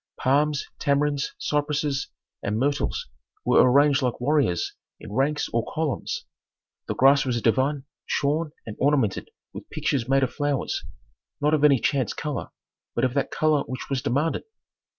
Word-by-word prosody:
Palms, 145 +2 +2
tamarinds, 145 0 0
cypresses, 145 -1 -1 0.3
and 105 +2 -1
myrtles 140 +4 0 0.4
were - - +5
arranged 140 +1 +5
like 125 -2 -1
warriors 130 - +1 0.3
in - - -10
ranks 140 +5 +1
or 115 -1 +2
columns. 155 -4 -2 0.6
The - - -2
grass 135 +2 +5
was 125 -3 -1
a - - -3
divan 135 +5 +1 0.2
shorn 150 +2 0
and 110 - -7
ornamented 135 -8 +1 0.2
with - - -9
pictures 130 -3 -1
made 135 0 +4
of 130 - -1
flowers, 145 -2 -1 0.6
not 150 +1 +2
of 150 -2 +2
any 145 -2 +6
chance 135 +1 0
color, 150 -4 -3 0.5
but 120 - +2
of 125 - -1
that 140 -1 0
color 155 -2 +2
which 130 +2 -6
was 135 -2 0
demanded. 145 +7 0
140 Hz, 150 wpm, -25 LUFS, 130-150 Hz, 0.6 s, any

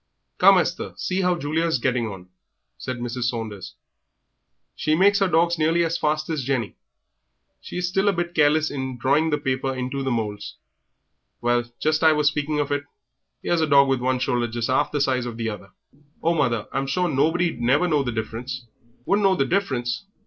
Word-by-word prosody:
"Come, - - +7
Esther, - - -1
see 185 +1 -1
how 180 -1 +1
Julia 160 +2 -1
is 160 - +1
getting 120 -2 0
on," 95 -3 -9 0.5
said 130 -2 -4
Mrs. 120 0 -3
Saunders; 110 -5 -4 1.0
"she 155 - +1
makes 200 +4 +4
her 195 - +3
dogs 170 -1 +2
nearly 165 +2 +2
as 165 0 -1
fast 155 0 0
as 155 -4 -2
Jenny. 125 -5 -2 0.9
She - - -8
is 180 0 -1
still 195 +3 0
a - - +2
bit 175 -1 -3
careless 155 0 +3
in 130 -2 -4
drawing 140 +6 +2
the 150 - +1
paper 135 -2 -2
into 130 +2 -3
the 135 - -1
moulds. 105 -4 -3 0.8
Well, 120 0 +1
just 155 0 +1
as 160 - +6
I - - +4
was 150 -1 0
speaking 150 +1 0
of 145 -1 -1
it: 145 0 -1 0.6
'ere's 175 -1 +1
a 160 - +2
dog 140 -2 +5
with 135 -1 +1
one 130 +1 +1
shoulder 125 -2 0
just 115 +2 -3
'arf 130 - +1
the 145 - -1
size 130 -3 0
of 115 -2 -6
the 115 -1 -2
other." 100 -2 -9 0.5
"Oh, 170 - +3
mother, 120 -9 0
I'm 135 0 -2
sure 180 +6 0
nobody'd 160 0 +1
never 140 +9 +3
know 150 -4 +2
the 125 -3 -2
difference." 120 +3 -5 0.4
"Wouldn't 205 +1 +2
know 195 -1 +4
the 135 - +1
difference! 130 -8 -1
140 Hz, 200 wpm, -23 LUFS, 120-160 Hz, 1.0 s, Come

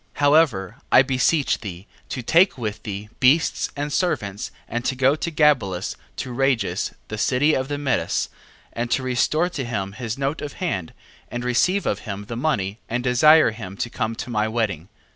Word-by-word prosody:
9:3. - - -13
However, 145 - +3
I 130 - +8
beseech 135 +3 +1
thee, 95 -3 -8 0.2
to 125 - -4
take 170 - +4
with 110 -3 -4
thee 105 0 -6
beasts 140 +6 +3
and 145 0 -3
servants, 115 - -1 0.2
and 120 +1 -3
to 130 - 0
go 135 +2 +3
to 165 - -3
Gabelus 130 - +2 0.2
to 130 - -5
Rages 120 -6 0
the 110 - -5
city 140 +6 +3
of 130 -1 0
the 145 0 -3
Medes: 140 -3 0 0.5
and 120 +1 -3
to 130 - +1
restore 140 +7 +1
to 145 -6 -4
him 100 -5 -3
his 115 +2 -5
note 140 +3 -2
of 145 -1 -5
hand, 95 - -3 0.4
and 120 0 -4
receive 180 +11 +2
of - - 0
him 100 -2 -6
the 115 - -6
money, 115 -7 -1
and 120 +2 -1
desire 130 +3 +6
him 100 -4 -8
to 120 - -3
come 110 +1 -2
to 120 - -6
my 110 -1 +1
wedding. 105 -7 -2
125 Hz, 185 wpm, -23 LUFS, 105-145 Hz, 0.5 s, I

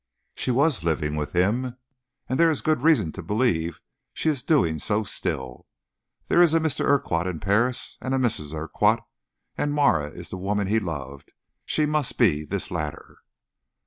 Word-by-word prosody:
"She - - -3
was 135 - +2
living 75 -2 0
with 75 -1 -3
him, 120 +8 +1 0.5
and 130 - -1
there 165 0 +6
is 155 - -1
good 155 -5 +1
reason 150 - +3
to 95 - -8
believe 90 -4 0 0.4
she 160 - 0
is 145 -4 -1
doing 85 - +2
so 105 +7 0
still. 65 -10 -4 0.6
There 175 - +4
is 165 -2 +5
a - - +5
Mr. 160 -3 -1
Urquhart 95 -11 +1
in 90 -4 -3
Paris, 115 +7 0
and 130 +1 -1
a - - +2
Mrs. 105 - 0
Urquhart. 105 +8 +1 0.6
As 145 - +1
Marah 140 - +2
is 85 +2 -10
the 95 - -4
woman 100 +2 -1
he 110 +4 +2
loved, 70 -7 -6 0.3
she 155 - +1
must 150 -2 0
be 80 -11 +3
this 75 - -4
latter." - - -5
105 Hz, 175 wpm, -25 LUFS, -, 0.6 s, there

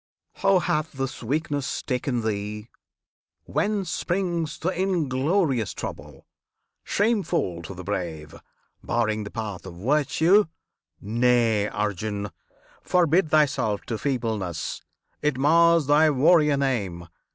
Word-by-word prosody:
How 195 -1 +4
hath 160 -2 -1
this 135 -1 -4
weakness 140 +1 -2
taken 125 -2 -1
thee? 105 +1 -3 0.7
Whence 200 -4 -1
springs 170 -4 -1
The 175 - -1
inglorious 160 - 0
trouble, - - -8 0.6
shameful 195 - 0
to 90 +3 -8
the 90 - -8
brave, 85 -6 -4 0.5
Barring 110 -3 0
the - - -6
path 105 -5 -5
of 85 - -9
virtue? 150 - +3 0.5
Nay, 115 -1 +2
Arjun! 105 0 -3 0.5
Forbid 175 -1 +2
thyself 140 -9 +2
to 115 -4 -4
feebleness! 110 - -2 0.4
it 150 -3 0
mars 165 +3 +4
Thy 150 +3 +5
warrior 150 +1 +4
name! 100 -11 -2
130 Hz, 105 wpm, -25 LUFS, 105-160 Hz, 0.7 s, Thy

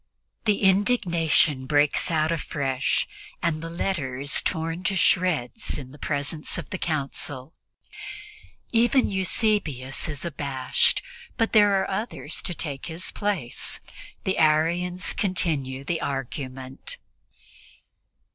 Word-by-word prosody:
The 210 -2 +2
indignation 175 - +3
breaks 145 0 +3
out 160 -1 +2
afresh, 140 -5 0 0.4
and 160 -2 +1
the 165 - -5
letter 165 -7 -2
is 140 +1 +4
torn 165 +2 -2
to 195 - +1
shreds 175 -10 +1
in 130 -3 -8
the 145 - -14
presence 145 +1 -1
of - - -6
the 190 - -3
Council. 145 -2 -2 1.2
Even 240 +2 +3
Eusebius 185 - 0
is 145 0 -4
abashed, 140 -5 +1 0.3
but 225 -2 +1
there 205 -2 +6
are - - -1
others 190 -6 -3
to 175 - -4
take 140 -5 -4
his 170 +2 -2
place. 195 - -2 0.4
The 190 - 0
Arians 170 +4 +3
continue 150 -9 0
the 165 +3 -2
argument. 130 -1 -5
160 Hz, 115 wpm, -25 LUFS, 140-185 Hz, 1.2 s, there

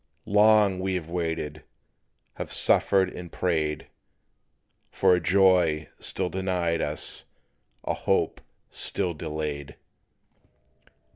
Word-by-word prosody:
Long 105 -2 +4
we 95 0 -1
have 85 -2 -5
waited, 80 -4 -3 0.7
have - - -5
suffered 95 -1 +3
and 90 -1 -9
prayed 80 -4 -1 1.0
For 95 -1 +3
a 90 - +3
joy 90 -4 +3
still - - -1
denied 90 -3 -1
us, 75 +1 -3 0.6
a - - -1
hope - - 0 0.3
still 90 -3 -2
delayed. 75 -2 -5
90 Hz, 95 wpm, -26 LUFS, 80-95 Hz, 1.0 s, Long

